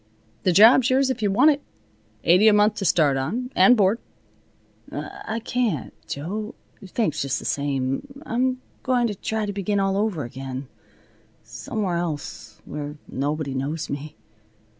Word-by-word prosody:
The 185 - +2
job's 230 +7 +7
yours 265 +1 +3
if 255 - -4
you 205 - +2
want 255 +10 +5
it. 285 0 -2 0.6
Eighty 185 +6 +5
a 215 - +7
month 210 +1 +4
to 200 - -2
start 150 -6 +3
on, 240 - -3
and 250 -1 +6
board." 205 +3 +3 0.9
"I 220 +1 -5
can't, 230 - -1
Jo. 205 +9 -4 0.3
Thanks 190 -5 -1
just 135 -1 -1
the - - -7
same. 135 - -1 0.2
I'm 255 +1 0 0.2
going 250 -2 +2
to 220 - -1
try 220 +2 -2
to 205 - -3
begin 200 +1 -1
all 195 0 +1
over 200 -7 0
again, 130 +2 -6 0.8
somewhere 195 -6 -3
else, 165 -4 -5
where 150 0 -6
nobody 145 +1 -2
knows 145 +4 -3
me." 145 +2 -5
195 Hz, 150 wpm, -24 LUFS, 145-225 Hz, 0.9 s, job's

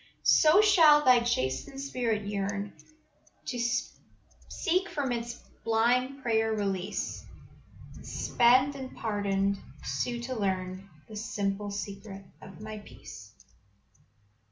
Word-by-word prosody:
"So 320 +6 +6
shall 320 -8 +6
thy 250 -1 +7
chastened 235 - -2
spirit 240 -6 -2
yearn 200 0 -3 0.7
To 245 - -4 0.9
seek 370 +1 0
from 280 -4 -2
its 235 0 -3 0.3
blind 250 +4 +1
prayer 225 -1 +1
release, 195 -2 -3 0.7
And - - -13
spent 255 +4 +3
and 265 -2 -8
pardoned, 200 -2 0 0.2
sue 235 - -2
to 255 +2 -4
learn 190 -3 -3 0.2
The 215 - -10
simple 205 -1 -2
secret 200 -1 -7 0.2
of 195 +1 -12
My 215 0 -7
peace. 115 - -12
220 Hz, 105 wpm, -29 LUFS, 200-255 Hz, 0.9 s, thy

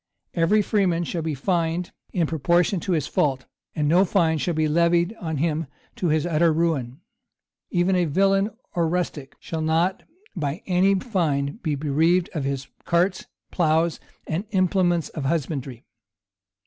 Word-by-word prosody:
Every 190 +5 +3
freeman 185 -5 +1
shall 170 0 -3
be 155 -2 -2
fined 170 +3 -1 0.2
in 170 -3 +1
proportion 170 +5 +1
to 185 - -2
his 155 -4 0
fault; 135 -3 0 0.3
and 150 -2 0
no 175 +5 +5
fine 165 -5 +2
shall 170 +2 -1
be 155 0 +2
levied 170 +5 +2
on 160 -6 -3
him 160 +1 -1 0.3
to 180 - -1
his 155 0 +1
utter 165 0 +3
ruin; 155 -4 -1 0.7
even 180 +1 +2
a 180 -1 +2
villain 195 +5 +2 0.2
or 170 -2 +1
rustic 165 -6 -3
shall 160 -1 -5
not 165 +4 +1 0.3
by 155 0 -3
any 190 +2 +3
fine 165 - -1
be 155 -3 -1
bereaved 160 +5 +1
of 150 -5 -2
his 135 -1 -3 0.2
carts, 180 +2 +1 0.2
ploughs, 165 -1 +1 0.3
and 170 +6 -3
implements 185 -4 +1
of 150 -4 -5
husbandry. 135 -5 -3
165 Hz, 150 wpm, -24 LUFS, 155-180 Hz, 0.7 s, no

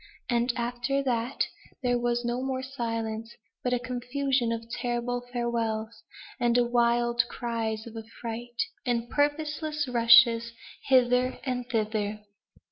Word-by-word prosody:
And 240 +1 +2
after 245 +3 -1
that 245 0 0 0.4
there 245 -1 +2
was 240 0 0
no 240 +1 -1
more 260 0 -2
silence; 230 -3 -4 0.3
but 250 - 0
a 250 - +3
confusion 250 0 -1
of 230 0 -3
terrible 245 0 -2
farewells, 230 -2 -2 0.4
and 240 0 +3
wild 240 0 +3
cries 225 -2 -3
of 230 -1 -10
affright, 230 - -4 0.2
and 240 -2 -1
purposeless 300 0 0
rushes 235 -1 +6 0.3
hither 250 -1 +4
and 250 -2 -3
thither. 215 -2 -1
240 Hz, 120 wpm, -28 LUFS, 230-250 Hz, 0.4 s, rushes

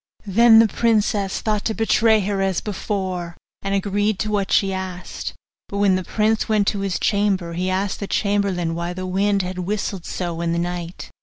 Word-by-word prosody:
Then 225 +3 +6
the 225 0 +7
princess 215 -3 +1
thought 215 -2 0
to 220 - 0
betray 225 -1 +3
her 200 0 -1
as 195 -2 +1
before, 185 -4 -4 0.2
and 195 0 -1
agreed 205 +1 0
to 215 - -2
what 200 -2 -1
she 195 -1 +3
asked: 185 -1 -5 0.3
but 200 - -4
when 200 -1 +4
the 185 - -1
prince 215 +4 0
went 210 -2 +3
to 205 - -3
his 195 -2 -1
chamber 200 -5 +1
he 180 +2 -1
asked 190 +1 -1
the 200 - -4
chamberlain 200 -6 0
why 170 +1 -3
the 185 +1 -5
wind 195 +1 +1
had 185 0 -5
whistled 195 -1 -3
so 170 -2 -3
in 170 0 0
the - - -1
night. 175 0 -4
195 Hz, 190 wpm, -21 LUFS, 185-210 Hz, 0.3 s, the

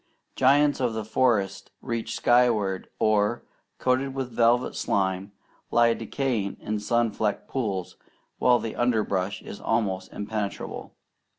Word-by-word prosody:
Giants 145 +2 +4
of 125 -3 0
the 110 -1 -3
forest 110 -5 +1
reach 115 -2 -3
skyward, 115 -6 +2
or, 110 +2 +2 0.3
coated 130 +1 0
with 130 -2 -3
velvet 120 +2 +2
slime, 95 0 -1 0.4
lie 120 0 +4
decaying 115 -3 -2
in 105 0 -3
sun 115 +2 +1
flecked 105 -1 -2
pools, 100 -9 -3 0.4
while 125 -1 +5
the 115 -2 -5
underbrush 105 -5 0
is - - -9
almost 100 -5 -1
impenetrable. 105 -1 -5
115 Hz, 120 wpm, -26 LUFS, 100-125 Hz, 0.4 s, while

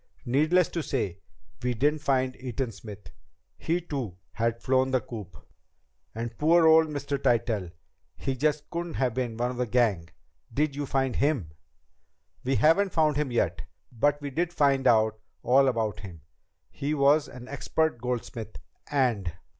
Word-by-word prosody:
Needless 155 +8 +3
to 170 - -3
say, 115 - -2 0.4
we 125 0 -1
didn't 145 +5 +1
find 130 -3 +1
Eaton 125 -1 -3
Smith. 105 -2 -11 0.4
He, 170 +2 -1
too, 135 - -5
had 115 +1 -1
flown 130 +1 +2
the 130 -1 +2
coop." 105 -7 -9 0.8
"And 115 +1 -4
poor 165 +2 +5
old 160 0 +6
Mr. 145 -2 -3
Tytell... 110 -6 +1 0.5
he 135 -1 -2
just 150 +2 0
couldn't 170 -1 -4
have 130 -3 0
been 120 -2 -3
one 120 +1 0
of 125 - -7
the 125 0 -1
gang. 105 -8 +1 0.4
Did 145 +3 0
you 145 -1 -3
find 135 -2 0
him?" 135 - 0 0.9
"We 135 +2 +1
haven't 165 +8 +4
yet - - -13
found 155 -2 +3
him, 150 -3 -1 0.6
but 145 +5 +1
we 140 -1 -5
did 170 +5 -1
find 140 -5 +2
out 110 -1 +3 0.2
all 135 +3 +5
about 110 -5 0
him. 90 -6 -10 0.5
He 145 +2 -2
was 145 +1 +4
an 125 0 -11
expert 140 -1 -1
goldsmith, 120 -3 -4 0.3
and 120 -11 +1
130 Hz, 155 wpm, -27 LUFS, 115-150 Hz, 0.9 s, old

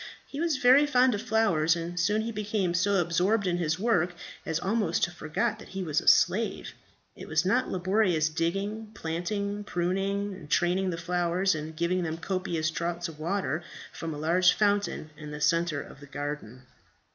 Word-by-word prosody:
He 280 - -8
was 325 -4 +1
very 265 +4 +6
fond 255 -3 +4
of 205 - -2
flowers, 170 -9 +2
and 170 +1 -4
soon 210 +5 +2
he 230 - -3
became 210 -4 -1
so 200 +3 +2
absorbed 180 +4 +2
in 175 -1 +1
his 160 -2 0
work 180 -5 +1 0.3
as 160 - 0
almost 200 -3 0
to 175 - +2
forget 155 -3 -2
that - - -11
he 190 0 -5
was 155 -3 0
a - - -13
slave. - - +3 0.4
It - - -10
was 155 +2 +1
not 240 +7 +2
laborious 185 -3 +2
digging, 195 +7 -2
planting, 200 +5 -3
pruning 195 +2 -1
and 160 -6 -11
training 180 +4 +2
the 170 - -3
flowers, 175 +2 +1
and 155 0 -5
giving 175 +2 +1
them 165 -2 -3
copious 170 -3 -2
draughts 170 +1 -3
of 155 -2 -12
water 170 -2 -1 0.3
from 165 - -5
a 150 - -5
large 175 +4 +4
fountain 205 -6 0
in 150 -1 -8
the 150 0 -6
centre 165 -1 +1
of - - -14
the 145 - -12
garden. 145 -4 -6
175 Hz, 180 wpm, -28 LUFS, 160-200 Hz, 0.4 s, very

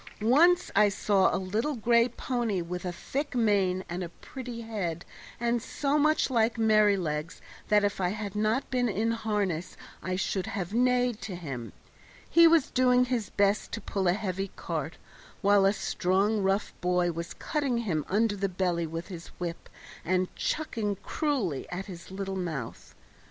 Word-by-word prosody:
Once 340 +10 +4
I 210 +1 +6
saw 195 -1 +2
a - - 0
little 215 +10 -1
gray 235 +1 +3
pony 240 -5 -2
with 175 +1 -5
a 180 - -1
thick 280 - -4
mane 195 -5 +2
and 175 +1 -4
a 170 - -5
pretty 245 +5 -8
head, 195 -7 -4 0.3
and 235 0 +1
so 285 +5 0
much 305 -1 +2
like 230 -1 +2
Merrylegs 200 -8 +2 0.3
that 210 -1 +4
if 200 -1 0
I 180 - +2
had 210 0 -5
not 215 +5 +1
been 250 -2 +1
in 220 +3 0
harness 210 -7 -2 0.2
I 185 - -2
should 190 0 -1
have 195 -2 -4
neighed 245 -1 +2
to 195 - -5
him. 135 -9 -6 0.6
He 335 0 +7
was 325 -4 +4
doing 250 -1 +4
his 245 -4 -2
best 200 +1 +1
to 230 - -2
pull 195 -1 -1
a 175 - +4
heavy 195 -1 -3
cart, - - -4 0.5
while 200 0 +5
a - - +4
strong 200 +2 +1
rough 195 +1 0
boy 180 -1 +2
was 170 +1 -6
cutting 285 -6 -1
him 155 -7 0
under 210 +2 +2
the 195 0 -1
belly 175 -2 -1
with 165 +3 -6
his 175 -3 -8
whip 175 -1 -5 0.3
and 185 +1 0
chucking 225 -10 -2
cruelly 255 - -1
at 185 +2 -4
his 175 -4 -10
little 195 0 -4
mouth. 160 -10 -5
205 Hz, 165 wpm, -28 LUFS, 180-235 Hz, 0.6 s, He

